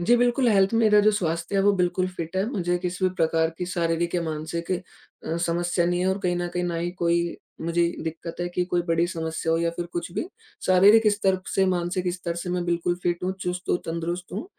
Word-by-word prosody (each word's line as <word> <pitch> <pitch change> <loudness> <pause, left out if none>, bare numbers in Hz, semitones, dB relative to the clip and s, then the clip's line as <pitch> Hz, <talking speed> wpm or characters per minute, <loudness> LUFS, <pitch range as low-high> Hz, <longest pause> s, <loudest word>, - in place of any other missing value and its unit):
जी 235 +8 +4
बिल्कुल, 245 +1 +3
हेल्थ 195 -2 +4
मेरा 215 -2 +5
जो 210 +1 +5
स्वास्थ्य 170 -2 -1
है 195 - +3
वो 205 - +5
बिल्कुल 185 0 +1
फिट 165 +2 -5
है। 190 - +2
मुझे 175 -7 0
किसी 180 +1 -3
भी 185 - +3
प्रकार 160 -1 +2
की 180 - -2
शारीरिक 170 -1 -1
या 175 - +1
मानसिक 160 +2 -4
अ, 180 -2 -6
समस्या 175 +1 0
नहीं 175 0 0
है 185 - +1
और 190 +1 0
कहीं 175 -1 +1
न 175 0 -2
कहीं 180 0 -2
ना 175 -1 -2
ही 170 +1 -2
कोई 170 0 +1 0.2
मुझे 170 +1 +1 0.2
दिक़्क़त 165 +1 -6
है 175 - -1
कि 180 0 -1
कोई 175 -1 0
बड़ी 165 +1 +2
समस्या 160 -1 -2
हो 165 - +2
या 170 0 +1
फ़िर 170 +1 -5
कुछ 170 0 -3
भी। - - -2 0.4
शारीरिक 205 +4 +6
स्तर 195 -2 +1
से, 195 - +4
मानसिक 180 0 0
स्तर 175 -2 -4
से 175 +1 -4
मैं 180 0 -1
बिल्कुल 175 0 0
फिट 175 0 -1
हूँ, 185 - 0
चुस्त 180 0 -4
हूँ, - - +2
तंदुरुस्त 170 +2 -4
हूँ। 200 +5 -4
175 Hz, 230 wpm, -25 LUFS, 170-185 Hz, 0.4 s, शारीरिक